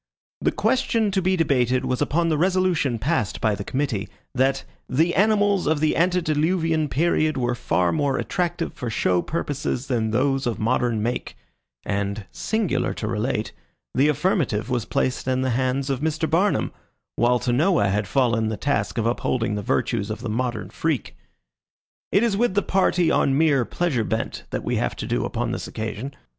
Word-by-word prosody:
The - - +2
question 230 -5 +1
to 190 0 +1
be 185 +1 +2
debated 130 -7 +2
was 130 +1 -1
upon 165 +4 +1
the 155 - +1
resolution 180 -8 +2
passed 125 - -1
by 110 -3 +2
the 100 - -4
committee, 130 -5 -2 0.2
that 135 +1 +1 0.3
"The 160 +6 +2
Animals 205 -1 +3
of 155 -1 +2
the 155 0 +2
Antediluvian 165 -2 +1
Period 155 0 +1
were 120 -1 0
Far 90 -7 +1
More 135 - 0
Attractive 175 -2 -2
for 125 - -5
Show 90 -5 +1
Purposes 145 - -3
than 115 -4 0
those 135 +3 +1
of 120 - -1
Modern 115 -1 0
Make," 120 +2 -3 0.5
and, 100 +1 -2
singular 220 -4 -1
to - - -4
relate, - - -1 0.4
the 135 +3 +3
affirmative 145 - 0
was 120 -3 0
placed 130 +3 -1
in 130 0 +1
the 130 - 0
hands 130 +2 0
of 135 - -1
Mr. 160 +1 -1
Barnum, 180 +7 +1 0.4
while 120 +1 +3
to 120 0 -1
Noah 155 - +3
had 105 0 0
fallen 115 -1 +1
the 110 - -3
task 140 -2 -1
of 115 - 0
upholding 120 -1 0
the 105 - -2
virtues 100 +1 -1
of 110 - -4
the - - -4
modern 120 -1 -2
freak. 155 -8 -2 1.0
It 200 - +4
is 230 -4 +2
with 220 -2 +1
the 205 - +2
party 180 -3 +2
on 135 0 +2
mere 145 -5 +3
pleasure 150 -8 0
bent 110 +1 -3
that - - -3
we - - -1
have - - -1
to - - -5
do - - -1
upon - - -2
this - - -4
occasion. 110 +5 -5
135 Hz, 175 wpm, -23 LUFS, 115-165 Hz, 1.0 s, It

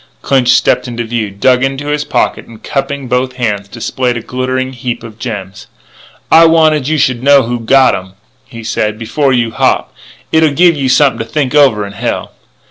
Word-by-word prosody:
Clinch 130 -3 +1
stepped - - +2
into 120 -1 -4
view, 115 -2 -3
dug 125 +6 +1
into 135 +2 -2
his 150 0 -1
pocket, - - -1
and, 115 -2 -15
cupping 140 -1 -3
both 125 +1 -1
hands, 105 -5 -2
displayed 120 +3 -3
a - - -5
glittering 130 +2 -3
heap 120 -1 -5
of 110 -1 -11
gems. 105 -5 -7 0.6
"I 165 +1 +7
wanted 155 -4 +3
you 155 +1 0
should 130 -4 0
know 140 0 +5
who's 115 -1 -4
gottem," 130 -9 +2 0.3
he 115 -2 -10
said, 110 -1 -2
"before 135 +5 -1
you 120 -3 0
hop. - - 0 0.4
It'll 160 -2 +3
give 170 +2 +4
you 135 -3 -1
something 135 +1 +3
to 115 - -6
think 145 -4 -1
over 130 -9 +3
in 100 - -9
hell." 105 - -4
130 Hz, 185 wpm, -12 LUFS, 115-140 Hz, 0.6 s, I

